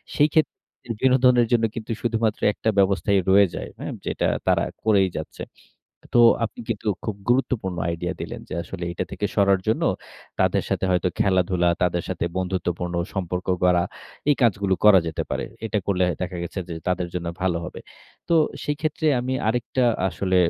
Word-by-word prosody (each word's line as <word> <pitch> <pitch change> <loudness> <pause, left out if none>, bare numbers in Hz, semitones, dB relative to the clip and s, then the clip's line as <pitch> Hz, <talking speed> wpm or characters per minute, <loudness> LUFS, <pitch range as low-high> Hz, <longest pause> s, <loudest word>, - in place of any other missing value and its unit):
সেই 150 - +5
ক্ষেত্রে 155 -1 +2 0.4
বিনোদনের 125 -2 +4
জন্য 120 -2 +3
কিন্তু 115 -1 -5
শুধুমাত্র 115 -2 0
একটা 110 - -1
ব্যবস্থাই 100 +1 +3
রয়ে 100 0 +6
যায় - - -5
হ্যাঁ? - - -5
যেটা - - 0 0.2
তারা - - +3 0.2
করেই 100 -4 +4
যাচ্ছে। - - -6 0.7
তো 120 - +7 0.2
আপনি 115 - -6
কিন্তু 110 -1 -2 0.2
খুব 110 -3 -3
গুরুত্বপূর্ণ 120 -7 +1
আইডিয়া 85 +2 -2
দিলেন - - -5
যে - - -5
আসলে 85 +2 -8
এইটা 85 +1 -3
থেকে 105 - -2
সরার 100 -2 +3
জন্য 110 - +1 0.6
তাদের - - +2
সাথে - - -1
হয়তো 90 0 +2
খেলাধুলা, 90 -2 +2
তাদের 90 -1 +1
সাথে - - -2
বন্ধুত্বপূর্ণ 90 -1 -2 0.2
সম্পর্ক 90 -1 -3 0.2
গড়া 90 -1 +4 0.5
এই 145 - +4
কাজগুলো 100 -4 +2
করা 105 -3 +8
যেতে 80 - -2
পারে। - - -1 0.2
এটা 105 - 0
করলে 95 -2 +2 0.2
দেখা 90 0 -4
গেছে 85 +3 -5
যে 85 - -4
তাদের 90 -1 0
জন্য 90 -1 -3 0.2
ভালো 90 -3 +1
হবে। 90 - -7 0.5
তো 170 - +3 0.3
সেক্ষেত্রে 155 +1 -2
আমি 130 +1 -2
আরেকটা 125 +2 0 0.2
আসলে 95 0 -1
95 Hz, 165 wpm, -23 LUFS, 90-115 Hz, 0.7 s, করা